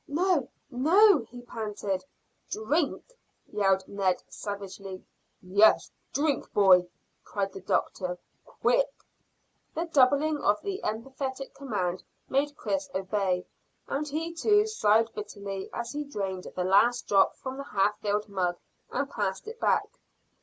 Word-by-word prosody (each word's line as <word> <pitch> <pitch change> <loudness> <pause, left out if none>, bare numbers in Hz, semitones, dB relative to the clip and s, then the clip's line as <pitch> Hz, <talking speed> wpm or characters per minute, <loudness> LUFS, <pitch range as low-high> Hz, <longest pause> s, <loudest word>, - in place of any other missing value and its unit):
"No, 330 -2 +1 0.2
no!" 340 - +6
he 245 0 -10
panted. 210 -5 -3 0.5
"Drink!" 285 +9 0 0.5
yelled 195 -2 +2
Ned 195 -2 0
savagely. 200 -2 -7 0.4
"Yes, 200 +4 +4 0.2
drink, 290 -1 0
boy!" 185 -3 +6 0.4
cried 195 -1 -3
the 195 - -8
doctor. 180 -1 -1 0.3
"Quick!" - - +1 0.9
The 330 - -1
doubling 295 0 +3
of 205 -4 +2
the 395 -1 -3
emphatic 265 +4 -4
command 190 -9 -2 0.3
made 285 +2 0
Chris 290 -1 -2
obey, 190 -1 0 0.4
and 300 +2 -2
he 320 +3 -3
too 415 +5 +4
sighed 225 - +2
bitterly 200 -2 -6
as 235 0 -4
he 295 +1 -3
drained 195 -9 -4
the 180 - 0
last 205 +6 +3
drop 195 -1 +4
from 260 0 -6
the 275 - -4
half 205 -4 +1
filled 210 0 -1
mug 180 -3 -1 0.3
and - - -1
passed - - -3
it 455 +1 -7
back. - - +2
220 Hz, 130 wpm, -28 LUFS, 195-290 Hz, 0.9 s, no